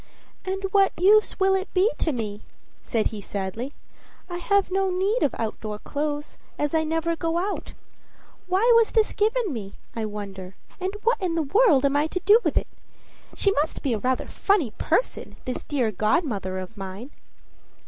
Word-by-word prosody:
"And 385 Hz, +1 st, -3 dB
what 395 Hz, -1 st, +4 dB
use 420 Hz, +4 st, +4 dB
will 385 Hz, 0 st, +4 dB
it 385 Hz, +1 st, -1 dB
be 385 Hz, +5 st, +4 dB
to 320 Hz, -, +1 dB
me?" 215 Hz, -5 st, -4 dB, 0.4 s
said 225 Hz, -3 st, 0 dB
he 210 Hz, -2 st, -7 dB
sadly. 200 Hz, +8 st, -4 dB, 0.6 s
"I 350 Hz, -, -3 dB
have 395 Hz, +2 st, +1 dB
no 385 Hz, 0 st, +1 dB
need 390 Hz, +6 st, +1 dB
of 285 Hz, -, +1 dB
outdoor 215 Hz, -1 st, -4 dB
clothes, 295 Hz, +5 st, -4 dB, 0.2 s
as 295 Hz, +1 st, -1 dB
I 320 Hz, 0 st, +3 dB
never 325 Hz, +1 st, 0 dB
go 330 Hz, +1 st, -1 dB
out. 390 Hz, +4 st, -3 dB, 0.7 s
Why 390 Hz, +6 st, +3 dB
was 460 Hz, -1 st, +5 dB
this 440 Hz, -2 st, +3 dB
given 435 Hz, -, +1 dB
me, 200 Hz, -5 st, -6 dB, 0.2 s
I 225 Hz, -1 st, -2 dB
wonder? 195 Hz, -3 st, -7 dB, 0.2 s
and 380 Hz, +2 st, -3 dB
what 470 Hz, -1 st, +2 dB
in 355 Hz, -3 st, 0 dB
the 325 Hz, -, +1 dB
world 305 Hz, -, +4 dB
am 280 Hz, 0 st, +2 dB
I 295 Hz, +2 st, +3 dB
to 365 Hz, -, -3 dB
do 415 Hz, +5 st, +6 dB
with -, -, +1 dB
it? -, -, +1 dB, 0.7 s
She 395 Hz, -, +2 dB
must 310 Hz, -4 st, -1 dB
be 270 Hz, -5 st, +1 dB
a 220 Hz, -, -1 dB
rather 255 Hz, +3 st, 0 dB
funny 380 Hz, -, +1 dB
person, -, -, 0 dB
this 255 Hz, -, -4 dB
dear 255 Hz, -7 st, 0 dB
godmother 210 Hz, -, 0 dB
of 185 Hz, +3 st, -7 dB
mine." 195 Hz, +7 st, -7 dB
315 Hz, 180 wpm, -25 LUFS, -, 0.7 s, do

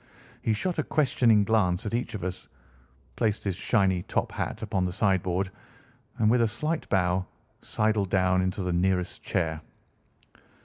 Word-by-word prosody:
He 110 Hz, -, +1 dB
shot 175 Hz, -, -2 dB
a -, -, +2 dB
questioning 120 Hz, -9 st, +3 dB
glance 100 Hz, -2 st, +1 dB
at 105 Hz, -, -3 dB
each 115 Hz, -1 st, -2 dB
of 100 Hz, -, -5 dB
us, 95 Hz, 0 st, -4 dB, 0.7 s
placed 110 Hz, -2 st, 0 dB
his 100 Hz, -3 st, -1 dB
shiny 95 Hz, -2 st, +1 dB
top -, -, -2 dB
hat -, -, -4 dB
upon 100 Hz, -4 st, -1 dB
the 90 Hz, -, -1 dB
sideboard, 95 Hz, 0 st, 0 dB, 0.7 s
and 110 Hz, -, +2 dB
with 120 Hz, +2 st, +4 dB
a 115 Hz, -, +4 dB
slight 150 Hz, +9 st, -3 dB
bow 90 Hz, -1 st, +1 dB, 0.3 s
sidled 105 Hz, -3 st, 0 dB
down 95 Hz, -1 st, +3 dB
into 95 Hz, +1 st, -1 dB
the 90 Hz, -1 st, -1 dB
nearest 90 Hz, 0 st, 0 dB
chair. 80 Hz, -3 st, -1 dB
95 Hz, 160 wpm, -27 LUFS, 90-110 Hz, 0.7 s, with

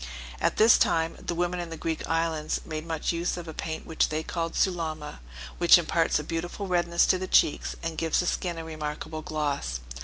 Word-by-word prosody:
At -, -, +1 dB
this 220 Hz, +1 st, +7 dB
time 165 Hz, 0 st, +2 dB
the 170 Hz, -, -2 dB
women 175 Hz, +1 st, -1 dB
in 175 Hz, -1 st, -4 dB
the 165 Hz, -, -6 dB
Greek 160 Hz, 0 st, -3 dB
islands 165 Hz, -1 st, 0 dB
make 155 Hz, -1 st, -4 dB
much 160 Hz, -2 st, -1 dB
use 170 Hz, +1 st, -1 dB
of 175 Hz, -1 st, -7 dB
a 160 Hz, -, -6 dB
paint 160 Hz, +1 st, -5 dB
which 160 Hz, -, +1 dB
they 155 Hz, +1 st, -2 dB
call 165 Hz, -1 st, -3 dB
Sulama, 160 Hz, -5 st, -1 dB, 0.4 s
which 175 Hz, 0 st, +8 dB
imparts 165 Hz, -1 st, +1 dB
a 150 Hz, -, -3 dB
beautiful 170 Hz, +5 st, -4 dB
redness 175 Hz, -2 st, +2 dB
to 185 Hz, -, +3 dB
the 185 Hz, -, -3 dB
cheeks, 150 Hz, -, +3 dB
and 165 Hz, -1 st, -3 dB
gives 165 Hz, -1 st, +1 dB
the 180 Hz, -, +1 dB
skin 175 Hz, -1 st, -1 dB
a 165 Hz, -, -5 dB
remarkable 155 Hz, 0 st, -5 dB
gloss. 145 Hz, -, -2 dB
165 Hz, 205 wpm, -27 LUFS, 155-175 Hz, 0.4 s, which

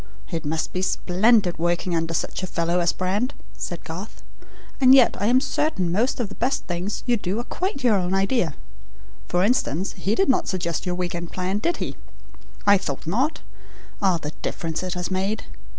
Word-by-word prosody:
"It 165 Hz, -3 st, -3 dB
must 160 Hz, +2 st, -2 dB
be 185 Hz, -, -1 dB
splendid 190 Hz, 0 st, +3 dB
working 175 Hz, +1 st, 0 dB
under 165 Hz, 0 st, -1 dB
such -, -, -2 dB
a 185 Hz, -, -3 dB
fellow 170 Hz, 0 st, 0 dB
as 170 Hz, -1 st, +3 dB
Brand," 205 Hz, +8 st, -1 dB, 0.2 s
said 175 Hz, -, -5 dB
Garth; 180 Hz, +6 st, -8 dB, 0.6 s
"and 260 Hz, 0 st, +8 dB
yet 255 Hz, -3 st, +6 dB
I 205 Hz, -, +1 dB
am 250 Hz, +2 st, +5 dB
certain 260 Hz, -, 0 dB
most 230 Hz, +10 st, +1 dB
of 240 Hz, -, 0 dB
the 200 Hz, -, -9 dB
best 255 Hz, +6 st, -1 dB
things 180 Hz, +3 st, -3 dB
you 245 Hz, -2 st, +2 dB
do 195 Hz, 0 st, -2 dB
are 235 Hz, -, -1 dB
quite 355 Hz, -1 st, -3 dB
your 225 Hz, -5 st, +5 dB
own 180 Hz, 0 st, 0 dB
idea. 195 Hz, -, +1 dB, 0.7 s
For 180 Hz, +1 st, +2 dB
instance, 195 Hz, -, +1 dB
he 205 Hz, +3 st, -1 dB
did 390 Hz, -, +3 dB
not 265 Hz, -, +2 dB
suggest 170 Hz, -2 st, -2 dB
your 180 Hz, -, 0 dB
week 180 Hz, -1 st, -2 dB
end 170 Hz, 0 st, -5 dB
plan, 185 Hz, +2 st, -1 dB
did 340 Hz, +10 st, 0 dB
he? -, -, -4 dB, 0.7 s
I 200 Hz, -1 st, +6 dB
thought 145 Hz, -8 st, -4 dB
not. 250 Hz, -, 0 dB, 0.6 s
Ah, 190 Hz, -3 st, +3 dB
the 150 Hz, -2 st, -5 dB
difference 165 Hz, -1 st, -3 dB
it 185 Hz, -1 st, -3 dB
has 180 Hz, +1 st, -3 dB
made! 195 Hz, +3 st, -1 dB
185 Hz, 195 wpm, -24 LUFS, 175-225 Hz, 0.7 s, and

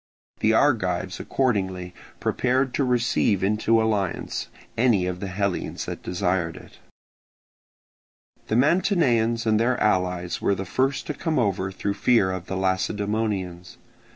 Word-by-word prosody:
The 110 Hz, -, +3 dB
Argives 95 Hz, -8 st, +1 dB
accordingly 95 Hz, -8 st, -1 dB, 0.3 s
prepared 130 Hz, +1 st, 0 dB
to 140 Hz, -, +1 dB
receive 120 Hz, -5 st, +1 dB
into 105 Hz, +3 st, +2 dB
alliance 105 Hz, -5 st, -1 dB, 0.3 s
any 115 Hz, -6 st, +3 dB
of 90 Hz, 0 st, -3 dB
the 100 Hz, -, -4 dB
Hellenes 95 Hz, 0 st, -2 dB
that -, -, -6 dB
desired 90 Hz, -2 st, -1 dB
it. -, -, -15 dB, 1.7 s
The 110 Hz, -, 0 dB
Mantineans 130 Hz, -, +2 dB
and 110 Hz, -1 st, +3 dB
their 120 Hz, +2 st, +1 dB
allies 90 Hz, -3 st, 0 dB
were 100 Hz, -, +2 dB
the 95 Hz, +1 st, -5 dB
first 130 Hz, +7 st, 0 dB
to 150 Hz, -, -3 dB
come 160 Hz, +2 st, -2 dB
over 95 Hz, -5 st, 0 dB
through 100 Hz, +1 st, -2 dB
fear 105 Hz, -4 st, +3 dB
of 95 Hz, -1 st, -5 dB
the 95 Hz, -, -3 dB
Lacedaemonians. 95 Hz, 0 st, -2 dB
105 Hz, 130 wpm, -24 LUFS, 95-120 Hz, 1.7 s, The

